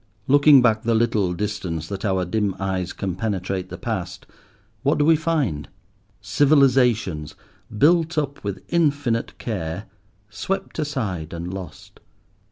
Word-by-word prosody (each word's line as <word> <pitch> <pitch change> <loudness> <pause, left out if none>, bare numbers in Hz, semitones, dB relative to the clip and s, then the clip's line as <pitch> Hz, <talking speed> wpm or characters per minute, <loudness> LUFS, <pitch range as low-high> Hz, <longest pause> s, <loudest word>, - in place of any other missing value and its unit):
Looking 145 -1 +7
back 110 -3 +3
the 115 0 +1
little 110 -5 +1
distance 90 -5 -3
that 100 -1 -5
our 95 -3 0
dim 100 +1 -1
eyes 95 -2 -2
can 95 -3 -4
penetrate 95 -2 -3
the - - -7
past, - - -4 0.6
what 140 - +2
do 145 - +2
we 165 +1 +6
find? 150 - -1 0.5
Civilizations, 120 - +2 0.4
built 165 +4 +3
up 145 -2 -2
with 100 -1 -4
infinite 145 -8 0
care, 95 -3 -4 0.4
swept 190 - -4
aside 105 - -3
and 85 +2 -5
lost. 95 -5 -9
110 Hz, 130 wpm, -23 LUFS, 95-140 Hz, 0.6 s, Looking